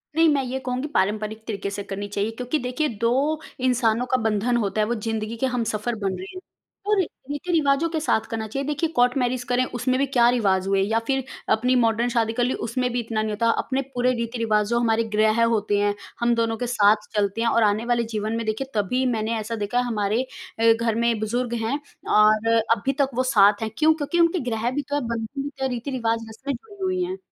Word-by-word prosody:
नहीं, 325 +1 +5
मैं 275 -2 +1
ये 260 +1 -3
कहूँगी 255 +3 -2
पारंपरिक 215 -2 -1
तरीके 200 -3 -3
से 200 0 -5
करनी 200 +1 -5
चाहिए 205 +2 -2
क्योंकि 250 +6 -2
देखिए 255 +4 -1
2 230 0 +3 0.5
इंसानों 245 -2 +2
का 255 - +4
बंधन 220 +2 +1
होता 215 -2 0
है 210 - +1
वो 240 - 0
ज़िंदगी 220 0 -3
के 265 - 0
हमसफर 235 -2 -1
बन 200 -3 -2
रहे 185 - -7
हैं, 370 - -7 0.5
और 420 -1 +2
रीति-रिवाजों 290 -1 0
के 320 -1 -2
साथ 220 -7 +1
करना 220 -1 -3
चाहिए 275 +6 -4
देखिए 300 +2 0
कोर्ट 245 +2 +3
मैरेज 250 -1 0
करें 245 +1 +1
उसमें 255 +1 -1
भी 275 - +3
क्या 245 -3 +3
रिवाज 195 -6 +1
हुए 195 0 +2
या 220 +3 +1
फिर 270 -1 +1 0.3
अपनी 250 +4 +3
मॉडर्न 235 0 +2
शादी 230 -2 0
कर 245 - 0
ली 250 - +1
उसमें 250 +2 -1
भी 245 - 0
इतना 225 -2 -2
नहीं 215 0 -2
होता 230 +2 +1
अपने 265 +1 -1
पूरे 250 0 +2
रीति-रिवाज़ 230 -3 0
जो 235 0 +2
हमारे 230 -1 +2
ग्रह 215 +2 +3
होते 215 -3 +1
हैं, 205 0 +2 0.3
हम 235 0 +2
दोनों 230 -1 0
के 245 - -3
साथ 210 -3 +3
चलते 205 +1 0
हैं 230 - +1
और 230 - +3
आने 210 +2 +1
वाले 240 -1 +1
जीवन 215 +1 -2
में 230 - -3
देखिए 220 +5 -2
तभी 235 +6 +1
मैंने 220 +1 -1
ऐसा 220 +2 -4
देखा 210 +2 -2
है 250 - +3
हमारे 215 -1 0 0.4
अ, 225 0 +6
घर 225 -1 -1
में 235 -1 +1
बुजुर्ग 240 +3 -2
हैं 260 +6 -1 0.4
और 215 +1 +4 0.3
अभी 270 +6 -1
तक 275 - +2
वो 255 - +2
साथ 205 0 +5
हैं 220 - -1
क्यों? 315 0 +5
क्योंकि 315 +2 -2
उनके 335 +1 +3
ग्रह 225 +1 -1
भी 290 +3 -1
तो 285 - -1
है 290 - 0
बंधन 230 +4 -4
भी 285 - -3
तो 275 -1 -8
हैं 265 - +1
रीति-रिवाज 230 -3 -2
उसमे 265 +6 -5
जुड़ी 400 +2 -10
हुई 370 -1 0
हैं। 370 +1 -4
230 Hz, 230 wpm, -24 LUFS, 215-255 Hz, 0.5 s, अ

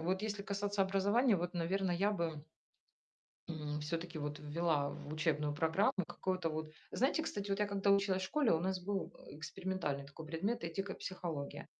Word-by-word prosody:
вот 185 +3 +1
если 210 -2 -2
касаться 200 0 -1
образования, 200 +5 +4
вот, 175 +1 -2
наверное, 180 +2 +1
я 200 +4 +3
бы 160 -5 -2 1.0
м, 150 -2 -3
всё-таки 165 +2 -3
вот 150 0 -3
ввела 150 -1 +1
в 150 - -7
учебную 150 -2 +1
программу 160 +6 +3
какое-то 185 -3 -1
вот 155 0 -3 0.2
Знаете, 275 +6 +2
кстати, 205 -10 -3
вот 195 - +2
я 210 - +3
когда 200 0 +2
училась 195 -1 +4
в - - +1
школе, 290 - +3
у 160 - +3
нас 185 0 0
был, 195 +1 -2
э, - - -9
экспериментальный 155 -2 -2
такой 155 +3 -9
предмет 180 +9 -1
"Этика, 190 +4 -2
психология". 165 -7 -4
180 Hz, 175 wpm, -36 LUFS, 155-200 Hz, 1.0 s, образования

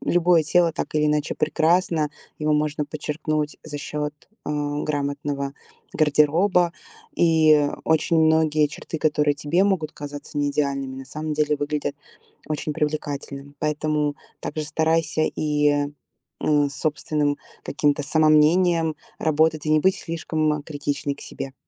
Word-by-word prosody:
любое 175 -2 +3
тело 170 +1 +3
так - - -5
или 150 0 +3
иначе 150 0 0
прекрасно, 160 0 +2 0.3
его 155 0 +1
можно 150 0 0
подчеркнуть 150 0 -3
за 145 -2 -6
счёт, 150 0 -4 0.3
а, - - -3 0.3
грамотного 140 -1 -2 0.4
гардероба. 165 +4 +3 0.4
И 155 -3 +5 0.2
очень 160 +1 +2
многие 155 -1 +3
черты, 160 - -7
которые 150 -2 +2
тебе 160 +6 +1
могут 185 -6 0
казаться 145 0 -7
неидеальными, 140 -2 -1
на 135 - -7
самом 155 +2 -5
деле 150 0 +1
выглядят 145 0 -2 0.5
очень 155 0 -3
привлекательным. 145 -2 -4
Поэтому 150 -1 0 0.2
также 155 - -4
старайся 160 0 +1
и, 150 -1 +1 0.7
э, 145 -1 +3
с - - -10
собственным 150 -1 -1 0.3
каким-то 145 0 +1
самомнением 160 +2 +3 0.2
работать 155 0 +2
и - - +1
не 155 0 +5
быть 190 +4 +3
слишком 155 -3 -2
критичной 145 -1 -3
к - - -15
себе. 135 -1 -7
150 Hz, 125 wpm, -23 LUFS, 145-160 Hz, 0.7 s, И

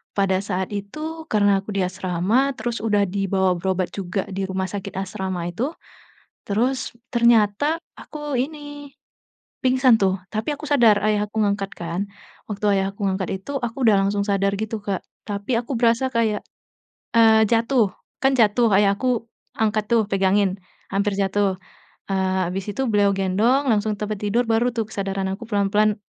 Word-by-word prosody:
pada 190 -2 +2
saat 190 -1 -3
itu 310 +11 -6
karena 205 -2 +3
aku 200 - -14
di 195 - +2
asrama 185 +8 0
terus 230 +1 -3
udah 210 -2 +2
dibawa 195 0 +1
berobat 185 +1 -1
juga 190 0 -2
di 190 0 -2
rumah 190 0 -2
sakit 200 -2 -6
asrama 190 -2 -3
itu, 255 - -3 0.7
terus 235 +4 -1 0.2
ternyata 235 +7 +3 0.2
aku 295 -4 -4
ini, 290 +1 -5 0.7
pingsan 255 -3 +4
tuh, 190 -1 +2 0.2
tapi 215 +1 -3
aku 300 - -10
sadar 240 -8 +5
ayah 210 -1 +1
aku 215 - -15
ngangkat 200 -1 -1
kan. 170 +1 -3 0.5
Waktu 210 0 -5
ayah 195 0 +1
aku 200 - -5
ngangkat 190 -1 -2 0.2
itu 285 - -6
aku 240 +1 -4
udah 205 - +6
langsung 200 +1 0
sadar 200 -1 +1
gitu 220 +1 -2
Kak, 200 -2 -2 0.3
tapi 205 +4 -2
aku 240 +3 -3
berasa 235 +2 +3
kayak, 225 -3 +1 0.7
eee, 220 -1 +6
jatuh, 230 -1 +2 0.3
kan 270 0 +3
jatuh, 230 0 +4
ayah 200 0 +5
aku 250 -1 0 0.4
angkat 215 -1 +1
tuh 230 -1 +5
pegangin, 195 0 +2 0.3
hampir 200 +1 +1
jatuh, 195 0 +1 0.6
eee, 190 -1 +1
habis 185 +2 -4
itu 265 +7 -2
beliau 205 -2 +3
gendong 215 +9 +2
langsung 215 -1 0
tempat 210 -1 -3
tidur 230 +4 +1
baru 225 +2 +2
tuh 225 -2 -2
kesadaran 195 -2 -3
aku 210 +5 -7
pelan-pelan 210 0 +2
205 Hz, 160 wpm, -22 LUFS, 195-235 Hz, 0.7 s, udah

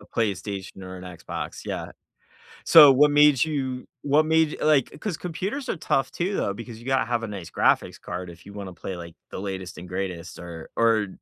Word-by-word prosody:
A 100 - -16
PlayStation 100 -3 -3
or 95 0 -8
an 90 - -9
Xbox, 90 -2 -6
yeah. - - -4 0.7
So 150 -4 +10
what 145 +3 +6
made 145 -2 +5
you 135 -5 -3 0.2
what 145 +2 +4
made 160 -1 +2
like, 150 -4 +3
'cause 200 -6 -3
computers 195 - -4
are - - -2
tough 135 -3 0
too, 185 +4 -2
though, 100 - 0
because 115 +2 -9
you 120 - -14
gotta 130 -3 +2
have 120 0 -1
a - - -2
nice 100 -5 -7
graphics - - +2
card 90 0 -6
if 85 -1 -13
you 100 - -11
wanna 100 -3 -7
play, 95 - -6
like, 85 -1 -9 0.2
the - - -5
latest 95 -2 -5
and 90 - -10
greatest, 90 -2 -4
or 85 -2 -9
or 115 -3 +3
115 Hz, 205 wpm, -25 LUFS, 95-145 Hz, 0.7 s, So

